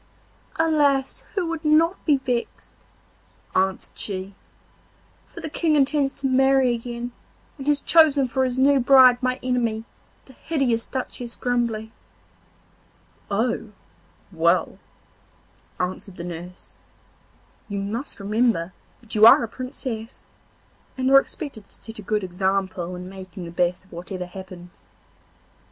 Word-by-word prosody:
'Alas! 290 Hz, -4 st, +1 dB
who 380 Hz, -3 st, 0 dB
would 330 Hz, -1 st, -4 dB
not 320 Hz, +4 st, +3 dB
be 295 Hz, -3 st, +5 dB
vexed?' 250 Hz, -3 st, -4 dB, 0.8 s
answered 190 Hz, 0 st, 0 dB
she, 195 Hz, -1 st, -5 dB, 0.9 s
'for -, -, -11 dB
the -, -, -4 dB
King 315 Hz, 0 st, +1 dB
intends 280 Hz, -1 st, +2 dB
to 275 Hz, -, -8 dB
marry 265 Hz, -1 st, +4 dB
again, 240 Hz, +1 st, -5 dB, 0.5 s
and 270 Hz, -, -7 dB
has 290 Hz, -1 st, +2 dB
chosen 300 Hz, -5 st, +5 dB
for 260 Hz, +2 st, 0 dB
his 255 Hz, -1 st, -1 dB
new 275 Hz, +1 st, +4 dB
bride 255 Hz, -1 st, +6 dB
my 255 Hz, 0 st, 0 dB
enemy, 235 Hz, -3 st, 0 dB, 0.4 s
the 265 Hz, -, -16 dB
hideous 260 Hz, -6 st, -1 dB
Duchess 250 Hz, -2 st, -5 dB
Grumbly.' 235 Hz, -3 st, -1 dB, 1.4 s
'Oh, 220 Hz, +1 st, -1 dB, 0.6 s
well!' -, -, +1 dB, 1.0 s
answered 185 Hz, +1 st, -4 dB
the 170 Hz, -, -7 dB
nurse, 175 Hz, +1 st, -9 dB, 0.9 s
'you 200 Hz, -, -4 dB
must 220 Hz, +7 st, -4 dB
remember 200 Hz, -4 st, 0 dB, 0.3 s
that 230 Hz, -2 st, -6 dB
you 215 Hz, +1 st, +8 dB
are 230 Hz, -, +8 dB
a -, -, -2 dB
Princess, 250 Hz, -2 st, -7 dB, 0.7 s
and 260 Hz, 0 st, +1 dB
are 275 Hz, -, +9 dB
expected 275 Hz, -7 st, -7 dB
to -, -, -25 dB
set 225 Hz, -1 st, -9 dB
a -, -, -6 dB
good 210 Hz, +1 st, -1 dB
example 185 Hz, -1 st, -1 dB
in 180 Hz, 0 st, -8 dB
making 185 Hz, -1 st, -9 dB
the 170 Hz, -, -8 dB
best 180 Hz, +2 st, 0 dB
of -, -, -26 dB
whatever 180 Hz, +1 st, -6 dB
happens. 180 Hz, -1 st, -12 dB
235 Hz, 130 wpm, -23 LUFS, 195-270 Hz, 1.4 s, are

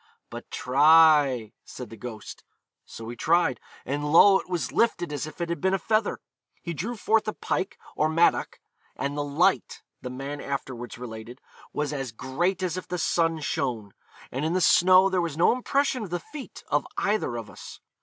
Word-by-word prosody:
'But -, -, -9 dB
try,' 145 Hz, -4 st, +4 dB
said 125 Hz, -, -9 dB
the -, -, -8 dB
ghost. 110 Hz, 0 st, -9 dB, 0.4 s
So 115 Hz, -, -10 dB
he 120 Hz, -, -6 dB
tried, 160 Hz, -1 st, +2 dB, 0.3 s
and 145 Hz, +2 st, -2 dB
lo! 190 Hz, +4 st, +7 dB
it -, -, -11 dB
was 175 Hz, -2 st, -2 dB
lifted 175 Hz, -9 st, +1 dB
as 145 Hz, +1 st, -3 dB
if 155 Hz, -, -11 dB
it 170 Hz, -1 st, -2 dB
had 170 Hz, -4 st, -3 dB
been 190 Hz, 0 st, +2 dB
a -, -, +1 dB
feather. 215 Hz, +3 st, 0 dB, 0.5 s
He 170 Hz, -, -4 dB
drew 215 Hz, +10 st, -4 dB
forth 220 Hz, 0 st, +1 dB
a 215 Hz, -, -1 dB
pike, 190 Hz, -, -3 dB, 0.2 s
or 155 Hz, -, +1 dB
mattock; 165 Hz, +2 st, +2 dB, 0.4 s
'and 140 Hz, +1 st, -3 dB
the 145 Hz, -, -1 dB
light,' 145 Hz, 0 st, 0 dB, 0.2 s
the 125 Hz, -, -6 dB
man 135 Hz, +3 st, -6 dB
afterwards 130 Hz, -4 st, -5 dB
related, 120 Hz, +1 st, -9 dB, 0.3 s
'was 150 Hz, 0 st, -2 dB
as 135 Hz, -4 st, -4 dB
great 175 Hz, -, -2 dB
as 180 Hz, -1 st, -2 dB
if 185 Hz, -, -6 dB
the 180 Hz, -, -3 dB
sun 165 Hz, -1 st, +1 dB
shone; 115 Hz, -8 st, -3 dB, 0.4 s
and 135 Hz, +3 st, -3 dB
in 160 Hz, +2 st, 0 dB
the 185 Hz, -, +2 dB
snow 185 Hz, +2 st, +6 dB
there 185 Hz, -2 st, +1 dB
was 165 Hz, -3 st, -3 dB
no 170 Hz, -, +5 dB
impression 260 Hz, +1 st, 0 dB
of 205 Hz, -, -6 dB
the 175 Hz, +1 st, -2 dB
feet 290 Hz, -, -10 dB
of -, -, 0 dB
either 205 Hz, -, 0 dB
of 115 Hz, -2 st, -6 dB
us.' -, -, -11 dB
155 Hz, 190 wpm, -26 LUFS, 130-185 Hz, 0.5 s, lo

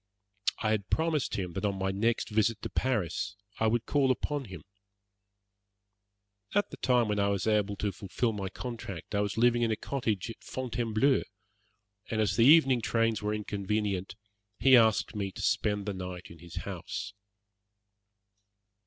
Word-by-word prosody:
I 110 Hz, -, +2 dB
had 105 Hz, -2 st, -1 dB
promised 160 Hz, -3 st, 0 dB
him 90 Hz, -3 st, -3 dB
that 95 Hz, -, -4 dB
on 100 Hz, -2 st, 0 dB
my 95 Hz, 0 st, 0 dB
next 115 Hz, +4 st, 0 dB
visit 110 Hz, +1 st, +1 dB
to -, -, -4 dB
Paris 105 Hz, -, -1 dB, 0.2 s
I 110 Hz, -, +3 dB
would 115 Hz, +1 st, +1 dB
call 140 Hz, -2 st, +2 dB
upon 140 Hz, +2 st, -1 dB
him. 90 Hz, -7 st, -9 dB, 1.9 s
At 205 Hz, -, +2 dB
the -, -, -8 dB
time 125 Hz, -3 st, +2 dB
when 105 Hz, -1 st, 0 dB
I 100 Hz, -, +3 dB
was 100 Hz, -1 st, 0 dB
able 105 Hz, -2 st, +1 dB
to 100 Hz, 0 st, -1 dB
fulfil 105 Hz, +5 st, -2 dB
my 100 Hz, -2 st, -4 dB
compact 110 Hz, -7 st, -7 dB
I 100 Hz, -, +2 dB
was 105 Hz, +1 st, -2 dB
living 120 Hz, +1 st, +4 dB
in 115 Hz, -, +2 dB
a 110 Hz, -, +1 dB
cottage 115 Hz, -5 st, -2 dB
at -, -, -14 dB
Fontainebleau, 125 Hz, +1 st, +1 dB, 0.9 s
and 110 Hz, -, -1 dB
as 100 Hz, -3 st, +2 dB
the 115 Hz, -, +5 dB
evening 135 Hz, -4 st, +6 dB
trains 115 Hz, -1 st, +1 dB
were 105 Hz, 0 st, -1 dB
inconvenient, 100 Hz, -2 st, -2 dB, 0.4 s
he 135 Hz, -1 st, +6 dB
asked 110 Hz, -3 st, +4 dB
me 100 Hz, -2 st, -2 dB
to -, -, -7 dB
spend 105 Hz, -1 st, +1 dB
the 105 Hz, -, -2 dB
night 90 Hz, -1 st, -7 dB
in 85 Hz, -, -13 dB
his 85 Hz, 0 st, -11 dB
house. 100 Hz, -, -5 dB
110 Hz, 165 wpm, -30 LUFS, 100-120 Hz, 1.9 s, evening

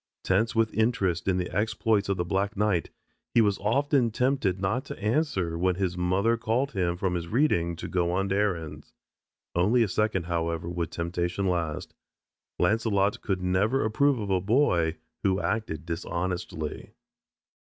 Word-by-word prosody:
Tense 105 Hz, +6 st, +1 dB
with 115 Hz, -1 st, +2 dB
interest 100 Hz, -7 st, +1 dB
in 95 Hz, -1 st, +2 dB
the 90 Hz, 0 st, -3 dB
exploits 105 Hz, 0 st, +1 dB
of 100 Hz, -, +1 dB
the 90 Hz, -, -1 dB
black 100 Hz, +3 st, -1 dB
knight, 100 Hz, -5 st, +1 dB, 0.5 s
he -, -, +7 dB
was 105 Hz, -3 st, +3 dB
often 135 Hz, +3 st, +2 dB
tempted 120 Hz, -5 st, 0 dB
not 100 Hz, +7 st, 0 dB
to -, -, -7 dB
answer 105 Hz, -, 0 dB
when 90 Hz, 0 st, +2 dB
his 90 Hz, -2 st, -1 dB
mother 95 Hz, +6 st, +1 dB
called 115 Hz, +5 st, 0 dB
him 90 Hz, -3 st, -1 dB
from 95 Hz, 0 st, -1 dB
his 85 Hz, -1 st, -3 dB
reading 85 Hz, -, +1 dB
to 85 Hz, -, -6 dB
go 85 Hz, -1 st, 0 dB
on 95 Hz, +2 st, 0 dB
errands. 95 Hz, -6 st, -2 dB, 0.6 s
Only 105 Hz, +8 st, +3 dB
a -, -, 0 dB
second, 100 Hz, -1 st, 0 dB
however, 85 Hz, -1 st, -2 dB
would 85 Hz, -2 st, -2 dB
temptation 85 Hz, +2 st, -2 dB
last. 85 Hz, -4 st, -2 dB, 0.6 s
Launcelot 105 Hz, +1 st, +1 dB
could 95 Hz, -3 st, -2 dB
never 100 Hz, +9 st, +2 dB
approve 140 Hz, +5 st, +2 dB
of 105 Hz, -3 st, -3 dB
a 95 Hz, -1 st, +2 dB
boy 90 Hz, -, +2 dB, 0.2 s
who 95 Hz, 0 st, +1 dB
acted 100 Hz, -9 st, -2 dB
dishonestly. 85 Hz, -2 st, -4 dB
95 Hz, 155 wpm, -27 LUFS, 85-110 Hz, 0.6 s, he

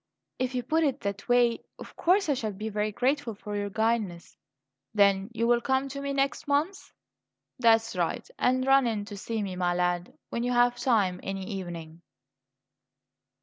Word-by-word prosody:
"If 255 Hz, 0 st, -1 dB
you 250 Hz, -, -1 dB
put 320 Hz, +6 st, +1 dB
it 280 Hz, -2 st, 0 dB
that 200 Hz, +2 st, -4 dB
way, 245 Hz, -1 st, +3 dB
of -, -, -11 dB
course 380 Hz, +3 st, +3 dB
I 290 Hz, -, +3 dB
shall 225 Hz, -5 st, -2 dB
be 215 Hz, +3 st, -5 dB
very 210 Hz, 0 st, -1 dB
grateful 255 Hz, +1 st, 0 dB
for 205 Hz, +1 st, -6 dB
your 205 Hz, 0 st, -2 dB
guidance." 220 Hz, -5 st, -1 dB, 0.6 s
"Then 200 Hz, -1 st, +4 dB
you 230 Hz, 0 st, -1 dB
will 240 Hz, 0 st, +3 dB
come 265 Hz, +1 st, 0 dB
to 280 Hz, +1 st, -6 dB
me 280 Hz, 0 st, -2 dB
next 275 Hz, +1 st, -1 dB
month? 300 Hz, +7 st, 0 dB, 0.7 s
That's 225 Hz, -2 st, +4 dB
right. 175 Hz, -2 st, -1 dB
And 255 Hz, +1 st, +2 dB
run 270 Hz, -1 st, +5 dB
in 210 Hz, -3 st, -2 dB
to 205 Hz, -, -8 dB
see 220 Hz, +2 st, -3 dB
me, 190 Hz, -2 st, -4 dB
my 175 Hz, -1 st, 0 dB
lad, 180 Hz, 0 st, 0 dB, 0.2 s
when 235 Hz, -, -2 dB
you 245 Hz, +1 st, 0 dB
have 245 Hz, 0 st, +4 dB
time 200 Hz, -8 st, +2 dB
any 195 Hz, -1 st, -4 dB
evening." 175 Hz, -5 st, -7 dB
225 Hz, 180 wpm, -28 LUFS, 195-255 Hz, 0.7 s, run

